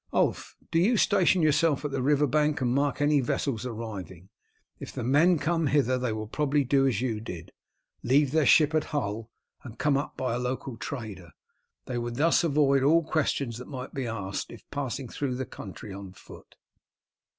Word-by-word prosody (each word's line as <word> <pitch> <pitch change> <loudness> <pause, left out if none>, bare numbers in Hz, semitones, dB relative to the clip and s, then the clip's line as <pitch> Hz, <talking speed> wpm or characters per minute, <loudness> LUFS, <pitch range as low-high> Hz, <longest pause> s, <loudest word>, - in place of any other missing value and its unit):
Ulf, - - 0
do 165 - +3
you 220 +7 +3
station 185 -3 +3
yourself 155 -1 +2
at 145 - -2
the 135 -1 -2
river 145 +2 +3
bank 150 +2 +1
and 125 -2 0
mark 140 +1 0
any 145 0 +4
vessels 125 -1 -1
arriving. 100 -6 -7 0.5
If - - -7
the - - -5
men 150 +8 +4
come 165 0 0
hither 130 -3 +2
they 125 -2 -1
will 110 0 -4
probably 145 +5 0
do 135 +1 +3
as 120 -4 0
you 115 -4 -1
did, 90 -7 -8 0.5
leave 135 +2 +3
their 155 -1 +2
ship 155 -1 +5
at 155 -1 +1
Hull 115 -6 -3 0.3
and 120 -2 -10
come 140 +1 +2
up 140 - -4
by 130 -3 -1
a 120 - -1
local 125 0 -3
trader. 105 -6 -7 0.5
They 125 -1 -3
would 120 0 -4
thus 165 +6 +3
avoid 140 -4 +3
all 160 +5 +4
questions 140 -6 -1
they 125 - -8
might 130 -2 -7
be 135 -3 -3
asked 100 -4 -4
if - - -13
passing 135 -2 -3
through 130 +2 -3
the 130 +1 -3
country 100 -1 -9
on 95 -1 -9
foot." - - -15
135 Hz, 190 wpm, -27 LUFS, 115-150 Hz, 0.5 s, ship